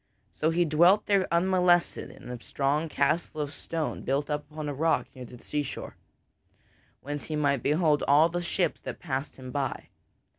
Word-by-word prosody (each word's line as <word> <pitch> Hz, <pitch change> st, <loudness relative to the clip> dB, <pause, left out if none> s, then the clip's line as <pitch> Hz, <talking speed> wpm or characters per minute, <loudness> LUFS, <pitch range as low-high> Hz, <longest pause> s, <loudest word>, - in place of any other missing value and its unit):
So 155 Hz, -, +1 dB
he 170 Hz, +1 st, +2 dB
dwelt 175 Hz, +7 st, +4 dB
there 200 Hz, -2 st, +2 dB
unmolested 175 Hz, 0 st, +2 dB
in 125 Hz, -, -11 dB
a 120 Hz, -1 st, -7 dB
strong 145 Hz, +5 st, -1 dB
castle 155 Hz, +2 st, 0 dB
of 145 Hz, -1 st, -3 dB
stone 165 Hz, -2 st, -4 dB
built 140 Hz, +3 st, -1 dB
up 150 Hz, 0 st, -3 dB
upon 155 Hz, -1 st, -6 dB
a 145 Hz, -, -2 dB
rock 160 Hz, +4 st, +1 dB
near 130 Hz, -2 st, -9 dB
to 125 Hz, -, -12 dB
the -, -, -20 dB
seashore, 145 Hz, -2 st, -4 dB, 1.1 s
whence 145 Hz, +1 st, -5 dB
he 155 Hz, -, -3 dB
might 140 Hz, -3 st, +1 dB
behold 150 Hz, +1 st, +2 dB
all 150 Hz, +3 st, +6 dB
the 175 Hz, +1 st, -3 dB
ships 175 Hz, +1 st, -1 dB
that -, -, -6 dB
passed 140 Hz, -3 st, -4 dB
him 130 Hz, -1 st, -9 dB
by. 140 Hz, 0 st, -3 dB
150 Hz, 180 wpm, -28 LUFS, 140-170 Hz, 1.1 s, all